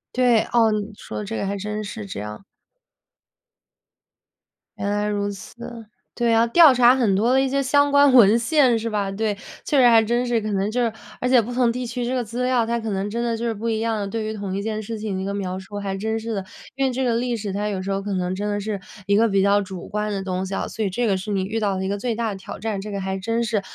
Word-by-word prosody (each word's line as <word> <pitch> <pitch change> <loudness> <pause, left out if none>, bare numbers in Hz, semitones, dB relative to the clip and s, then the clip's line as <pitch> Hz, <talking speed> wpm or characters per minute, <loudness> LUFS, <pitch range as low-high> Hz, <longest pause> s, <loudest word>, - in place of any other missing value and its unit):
对， 245 -3 +4
哦， 225 -2 +4
你 210 0 -2
说 105 -1 -6
这 110 +2 -4
个 - - -2
还 200 +1 -2
真 210 +2 -4
是 210 +1 -6
这 185 - -6
样。 105 - -7 2.3
原 200 +1 -2
来 205 0 0
如 205 -1 -1
此， 230 +3 -9 0.3
对 235 -1 +2
啊， 230 +1 +4
调 310 +2 +7
查 250 +1 +6
很 230 -7 +2
多 235 +6 +2
的 265 - +4
一 270 - +1
些 275 +1 +1
相 285 +2 +3
关 285 -2 +5
文 225 -2 +7
献 255 -2 +3
是 230 +1 -3
吧？ 200 -2 -1
对， 210 0 -1 0.3
确 290 - +1
实 245 - +7
还 230 -1 +7
真 240 +3 0
是 240 -2 +1
可 215 0 -4
能 195 +2 0
就 245 +1 0
是 230 - +1 0.3
而 250 - -1
且 250 -2 +5
不 240 +3 -6
同 245 -1 +3
地 250 +1 -4
区 240 0 -3
这 250 - -2
个 245 - 0
资 235 +3 -4
料， 250 -3 +2
它 235 +1 -1
可 225 -1 -4
能 195 +1 -2
真 235 +3 -2
的 235 -1 0
就 235 +1 -4
是 230 - 0
不 225 +2 -5
一 220 -1 0
样， 215 -3 -1
对 225 +1 -3
于 215 0 -3
同 200 -2 -4
一 200 - -2
件 215 0 -3
事 225 +2 -5
情 210 -2 -3
的 - - -3
一 - - -3
个 200 - -2
描 190 -2 -3
述 205 +2 -9
还 195 -1 -3
真 220 +3 -2
是 225 0 -4
的。 195 -2 -3 0.3
因 270 0 +1
为 260 - +1
这 260 +2 -2
个 240 -2 +1
历 240 0 0
史 205 -3 -4
它 205 +2 -2
有 195 -3 -2
时 195 +1 -3
候 195 0 -1
可 200 0 -4
能 180 0 -1
真 205 +2 -3
的 205 0 -1
是 205 -1 -3 0.3
一 200 - +3
个 230 +1 +4
比 195 -2 +2
较 200 +1 +4
主 190 -2 -7
观 210 0 -2
的 195 -1 -3
东 185 0 -2
西 195 - -6
啊， - - -2
所 220 - -4
以 195 - 0
这 235 +5 -1
个 195 -2 +2
是 205 +3 -5
你 195 -2 0
遇 220 +4 -2
到 200 -3 0
的 190 - -2
一 - - -2
个 200 - -1
最 230 +2 -2
大 230 -1 -1
的 200 - -4
挑 190 - -8
战。 215 -1 -3
这 210 +1 -7
个 200 -1 -3
还 190 0 -2
真 230 +4 -1
是。 215 -3 0
215 Hz, 310 characters per minute, -23 LUFS, 200-235 Hz, 2.3 s, 调